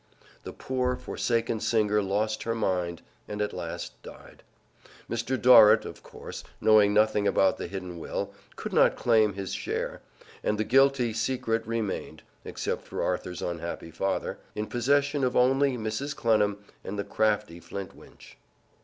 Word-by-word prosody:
The - - -8
poor, 125 -1 -1
forsaken 115 -2 -1
singer 105 -2 +2
lost 105 +2 -1
her 115 0 -2
mind 90 -5 -1 0.2
and 105 - -5
at 105 0 -1
last 85 -1 -6
died. - - -13 0.7
Mr. 120 +2 -2
Dorrit, 110 -2 +7
of - - -9
course, - - -9 0.2
knowing 105 -2 +5
nothing 105 -1 +3
about 95 -1 +2
the - - -4
hidden 90 -2 -6
will, - - -4 0.2
could - - -6
not - - +5
claim 110 -3 +3
his 95 0 -5
share, - - -3 0.4
and 105 - 0
the 110 - +1
guilty 130 0 +3
secret 115 -1 -1
remained 115 -3 -3 0.2
(except - - -3
for - - -3
Arthur's 90 - -3
unhappy 85 -1 -5
father) 95 +4 -2 0.2
in 105 - -2
possession 140 +4 +1
of 125 0 +1
only 135 +1 +3
Mrs. 115 +7 -3
Clennam 105 -3 +2 0.3
and 105 - -5
the 100 - -1
crafty 105 -3 0
Flintwinch. 95 +3 -10
110 Hz, 145 wpm, -27 LUFS, 100-120 Hz, 0.7 s, Dorrit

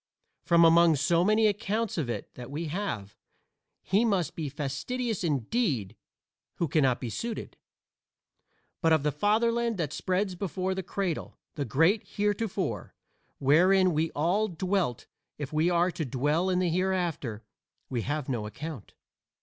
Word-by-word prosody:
From 170 -1 +5
among 165 0 +6
so 165 +5 +2
many 215 +3 +3
accounts 215 +1 0
of 150 -8 -2
it 110 -4 -5
that 125 0 -9
we 155 +4 -4
have, 145 - -4 0.7
he 200 +4 +2
must 195 -9 0
be 155 -3 -3
fastidious 180 - -3
indeed 140 - 0 0.6
who 170 - -1
cannot 135 -4 +2
be 120 -3 -4
suited. 230 - -5 1.3
But 165 -2 +4
of 155 -3 +3
the 150 - +1
Fatherland 230 +6 +1
that 155 -4 -2
spreads 185 +1 -1
before 185 0 -2
the 190 - -3
cradle 180 -2 -3 0.2
the 145 -2 -3
great 165 - +3
Heretofore, 205 0 -2 0.4
wherein 180 +6 +4
we 160 +2 +1
all 180 +8 +1
dwelt 180 - -1 0.3
if 145 -1 -6
we 155 +3 +3
are 175 +1 +2
to 160 - -3
dwell 150 +7 0
in 185 - +1
the 180 -1 +2
Hereafter, 175 - -1 0.4
we 120 -3 -2
have 145 +3 -3
no 120 -6 -2
account. 140 +2 -8
170 Hz, 145 wpm, -28 LUFS, 145-195 Hz, 1.3 s, among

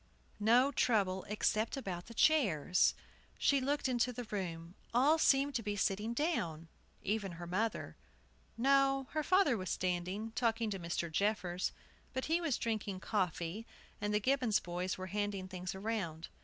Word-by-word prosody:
No 240 +6 +5
trouble, 200 -8 +1
except 215 +3 0
about 180 -9 -5
the 230 - -11
chairs. 200 - +3 0.4
She 280 -1 +3
looked 285 +2 0
into 250 -1 +1
the 245 0 -5
room; 175 -6 -5 0.2
all 290 +6 +5
seemed 280 -1 +4
to 235 - 0
be 205 -2 -2
sitting 210 +4 0
down, 170 - -1 0.3
even 200 -2 -1
her 175 +1 -7
mother. 185 - -2 0.6
No, 270 +2 +3
her 310 - 0
father 370 -4 +4
was 185 -4 -4
standing, 185 +4 -2
talking 225 -1 0
to 195 - -3
Mr. 170 -1 -3
Jeffers. 185 -1 0 0.4
But 260 0 -2
he 330 +2 +1
was 315 -7 0
drinking 210 -4 -2
coffee, 185 +1 -2 0.3
and 210 0 0
the 210 - +2
Gibbons 255 -2 +2
boys 180 +2 -3
were 185 - -5
handing 205 -2 -2
things 185 0 -5
around. 190 -6 -3
210 Hz, 155 wpm, -34 LUFS, 185-250 Hz, 0.6 s, No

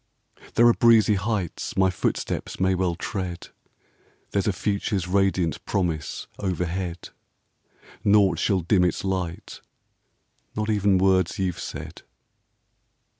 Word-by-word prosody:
There 120 - +5
are 120 - +7
breezy 115 -3 +5
heights 100 -3 -3
my 95 -1 +4
footsteps 90 - -3
Well 95 -1 +2
may 85 - -3
tread. 90 -1 -5 0.8
There 100 - +1
's - - -4
a - - +3
future's 100 -1 -2
radiant 95 -3 +1
promise 80 -6 -2
Overhead. 90 -1 -3 0.9
Naught 100 -2 +4
shall 95 -3 +1
dim 90 +2 +2
its 90 - 0
light, 95 -3 -4 0.9
not 105 +1 -1
even 100 -2 +3
Words 95 -2 +2
you 95 -2 0
've - - -12
said. - - -7
95 Hz, 125 wpm, -24 LUFS, 90-100 Hz, 0.9 s, are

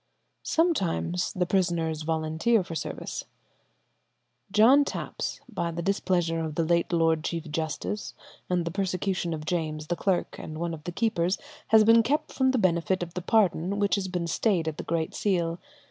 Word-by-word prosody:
Sometimes 185 - 0
the 180 -1 0
prisoners 170 -4 0
volunteer 160 +7 +1
for 175 - -8
service. 160 - -5 1.3
"John 235 +8 +6
Tapps, - - -4
by 180 -8 -2
the 170 +1 -4
displeasure 175 -3 +1
of 160 -2 -3
the 165 - +1
late 170 +2 +1
Lord 165 -2 +2
Chief 165 -2 -4
Justice 160 +6 -3 0.3
and 180 -2 +1
the 170 - -2
persecution 185 -1 -1
of 155 -2 -4
James 155 -3 -2
the 175 - -1
clerk 185 0 -1
and 155 - -7
one 170 +1 -2
of 150 -2 -9
the 175 - -3
keepers, 190 -3 0 0.3
has 220 0 +6
been 230 +1 +7
kept 280 +7 -1
from 260 -1 +2
the 260 - +2
benefit 185 -2 +1
of 170 -1 -8
the 180 - -4
pardon 195 -2 +2
which 205 -1 +1
has 195 -2 +1
been 180 -2 -2
stayed 170 0 +1
at 155 - -3
the - - -5
Great 165 -1 -2
Seal. 170 -4 0
175 Hz, 175 wpm, -27 LUFS, 165-200 Hz, 1.3 s, been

